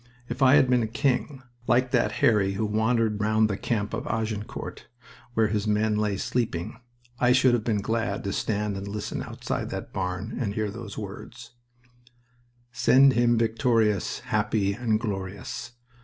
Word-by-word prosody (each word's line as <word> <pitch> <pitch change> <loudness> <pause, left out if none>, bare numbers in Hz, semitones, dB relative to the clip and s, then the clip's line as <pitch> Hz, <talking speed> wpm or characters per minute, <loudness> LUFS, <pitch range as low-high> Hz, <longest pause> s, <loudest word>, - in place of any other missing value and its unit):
If 120 +2 -5
I 135 +1 +7
had 145 -3 +5
been 125 -3 +2
king, 130 +3 -1 0.2
like 125 +1 +2
that - - +2
Harry 100 -4 +3
who 110 +3 -1
wandered 110 0 +1
round 110 +1 +3
the - - -1
camp 105 0 -2
of - - -4
Agincourt, 110 -1 -4 0.5
where 110 -1 +3
his 105 0 -1
men 105 +1 +2
lay 105 -2 0
sleeping, 115 -1 -2 0.4
I 125 0 +4
should 130 -1 +4
have 120 -3 +1
been 105 -3 0
glad 115 +2 -2
to 100 - -2
stand 105 -1 -1
and 100 +1 -6
listen 105 +1 -4
outside - - -4
that - - -6
barn 95 +4 -3
and 105 -5 -2
hear 110 -2 -1
those 110 -1 -8
words: 115 +4 -8 1.2
Send 135 +3 +5
him 120 0 +3
victorious, 115 -3 +1
Happy 100 -2 0
and 110 -1 0
glorious. 100 +2 -5
110 Hz, 155 wpm, -26 LUFS, 105-120 Hz, 1.2 s, I